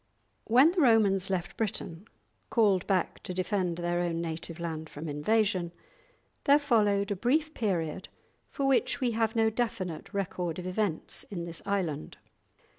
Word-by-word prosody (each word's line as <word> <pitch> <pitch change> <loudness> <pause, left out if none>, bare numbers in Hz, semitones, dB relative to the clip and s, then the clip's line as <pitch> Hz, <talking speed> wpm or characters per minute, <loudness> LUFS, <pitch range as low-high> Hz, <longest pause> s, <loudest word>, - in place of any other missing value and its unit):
When 260 +8 +6
the 355 -1 +1
Romans 205 -7 +4
left 185 -1 -2
Britain, 200 -3 -3 0.4
called 200 -6 +3
back 190 -3 0
to 180 - -5
defend 185 -2 -1
their 175 0 -1
own 170 -1 -1
native 165 0 -4
land 160 -2 -4
from 155 +3 -7
invasion, 180 +3 +1 0.7
there 285 +1 +7
followed 210 -8 +2
a - - +1
brief 295 - +1
period 185 - -2 0.4
for 280 - -2
which 270 -2 +2
we 250 -2 +1
have 225 0 0
no 225 -1 +3
definite 195 -8 -3
record 180 -4 -2
of 180 - -6
events 185 -2 -2
in 175 -4 -4
this 170 -1 -7
island. 180 -7 -2
195 Hz, 150 wpm, -29 LUFS, 170-225 Hz, 0.7 s, there